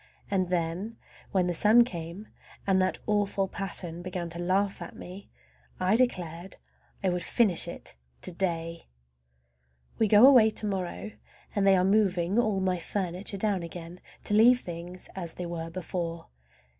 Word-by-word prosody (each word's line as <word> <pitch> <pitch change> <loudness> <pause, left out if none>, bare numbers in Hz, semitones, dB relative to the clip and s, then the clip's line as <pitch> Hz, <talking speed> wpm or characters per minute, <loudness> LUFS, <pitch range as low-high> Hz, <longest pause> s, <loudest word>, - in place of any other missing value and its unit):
And 185 -3 +1
then 180 +5 -2 0.3
when 185 -2 +2
the 175 - 0
sun 215 +7 +6
came 175 -1 -7 0.4
and 190 -1 +3
that 185 - 0
awful 205 -2 0
pattern 175 -3 -4
began 175 -1 -5
to 170 - -5
laugh 190 +2 0
at 175 - -8
me 185 +3 -10 0.5
I 185 +3 +2
declared 180 -7 -1 0.5
I 190 - +2
would 180 0 -1
finish 200 -2 +3
it - - -8 0.3
to - - +1
day! 170 -2 -2 1.1
We 220 - +4
go 210 +4 +7
away 250 -5 +7
to 215 - -3
morrow, 195 +1 -3 0.4
and 200 -1 +2
they 195 - +6
are 180 - +2
moving 195 -1 +2
all 215 -5 +1
my 185 -1 0
furniture 190 +2 -3
down 200 -2 0
again 170 +1 -8 0.2
to - - 0
leave 240 +4 +6
things 175 +1 -7
as 170 -4 -3
they 180 - -5
were 165 -1 -5
before. 170 -1 -5
185 Hz, 155 wpm, -28 LUFS, 175-205 Hz, 1.1 s, go